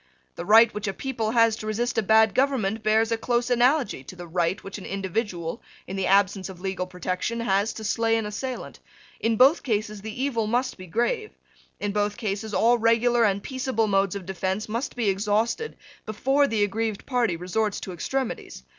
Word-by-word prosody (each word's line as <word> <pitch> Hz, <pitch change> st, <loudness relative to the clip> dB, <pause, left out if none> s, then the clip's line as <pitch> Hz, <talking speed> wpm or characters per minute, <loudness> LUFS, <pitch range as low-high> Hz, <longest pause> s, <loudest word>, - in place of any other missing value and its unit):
The 170 Hz, -, -6 dB
right 225 Hz, +2 st, +7 dB
which 210 Hz, 0 st, -4 dB
a 195 Hz, -, -1 dB
people 235 Hz, -4 st, -3 dB
has 230 Hz, -1 st, +4 dB
to 215 Hz, -, -7 dB
resist 235 Hz, +3 st, -1 dB
a 225 Hz, -, +2 dB
bad 220 Hz, 0 st, +4 dB
government 225 Hz, -5 st, +1 dB
bears 220 Hz, +1 st, +2 dB
a 230 Hz, -, +1 dB
close 240 Hz, +1 st, 0 dB
analogy 245 Hz, -, +2 dB
to 185 Hz, -, -10 dB
the 175 Hz, -1 st, -8 dB
right 170 Hz, +2 st, -1 dB
which 195 Hz, +1 st, -7 dB
an 190 Hz, -, -10 dB
individual, 190 Hz, -3 st, -3 dB, 0.2 s
in 190 Hz, -, -6 dB
the 195 Hz, -1 st, -1 dB
absence 195 Hz, 0 st, +2 dB
of 185 Hz, -2 st, -10 dB
legal 190 Hz, -1 st, -3 dB
protection, 185 Hz, +5 st, -3 dB
has 200 Hz, -1 st, +1 dB
to 220 Hz, -, -8 dB
slay 225 Hz, +1 st, +1 dB
an 225 Hz, -, -2 dB
assailant. 250 Hz, +5 st, -5 dB, 0.4 s
In 225 Hz, -1 st, +1 dB
both 270 Hz, +8 st, +6 dB
cases 215 Hz, -3 st, -2 dB
the 220 Hz, +3 st, -7 dB
evil 230 Hz, -6 st, 0 dB
must 245 Hz, +4 st, 0 dB
be 185 Hz, -1 st, -11 dB
grave. 335 Hz, -, -1 dB, 0.5 s
In 205 Hz, -, -2 dB
both 205 Hz, 0 st, -1 dB
cases 215 Hz, -2 st, -3 dB
all 235 Hz, +3 st, +3 dB
regular 230 Hz, +1 st, +3 dB
and 200 Hz, -1 st, 0 dB
peaceable 260 Hz, -4 st, -1 dB
modes 195 Hz, -2 st, +1 dB
of 195 Hz, -3 st, -6 dB
defence 190 Hz, +2 st, -2 dB
must 230 Hz, +6 st, -3 dB
be 235 Hz, -4 st, -1 dB
exhausted 210 Hz, -, 0 dB, 0.3 s
before 270 Hz, +7 st, +2 dB
the 220 Hz, -4 st, +1 dB
aggrieved 215 Hz, +1 st, -2 dB
party 240 Hz, -9 st, 0 dB
resorts 200 Hz, +4 st, -1 dB
to 190 Hz, -, -6 dB
extremities. 250 Hz, -, -4 dB
215 Hz, 190 wpm, -25 LUFS, 195-235 Hz, 0.5 s, right